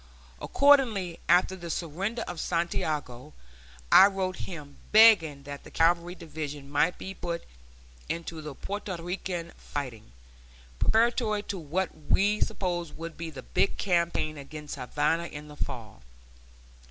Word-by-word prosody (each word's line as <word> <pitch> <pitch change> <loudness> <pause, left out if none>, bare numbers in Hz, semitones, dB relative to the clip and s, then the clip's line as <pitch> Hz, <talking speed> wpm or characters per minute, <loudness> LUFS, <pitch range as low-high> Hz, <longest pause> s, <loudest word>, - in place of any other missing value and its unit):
Accordingly, 235 -12 +3
after 185 +1 +4
the 170 -2 -8
surrender 190 +9 -2
of 175 -2 -6
Santiago, 150 - -2 0.6
I 195 - +10
wrote 190 -2 -2
him 150 -6 -8
begging 200 -11 +6
that 140 0 -8
the - - -12
cavalry 170 +2 +2
division 150 -4 -7
might 160 +5 +2
be 190 - -6
put 170 -2 -4 0.7
into 165 -1 -4
the 150 -2 -7
Porto 200 0 -4
Rican 175 0 -4
fighting, 125 - -6 0.7
preparatory 225 -2 +2
to 200 -2 -4
what 175 +4 -1 0.2
we 205 +2 +3
supposed 175 -4 -2
would 165 0 -6
be 165 0 -5
the 135 -4 -9
big - - 0
campaign 170 -4 0
against 150 +1 -8
Havana 150 +6 0
in 150 -1 -9
the 150 - -10
fall. 115 - -6
170 Hz, 130 wpm, -28 LUFS, 150-190 Hz, 0.7 s, I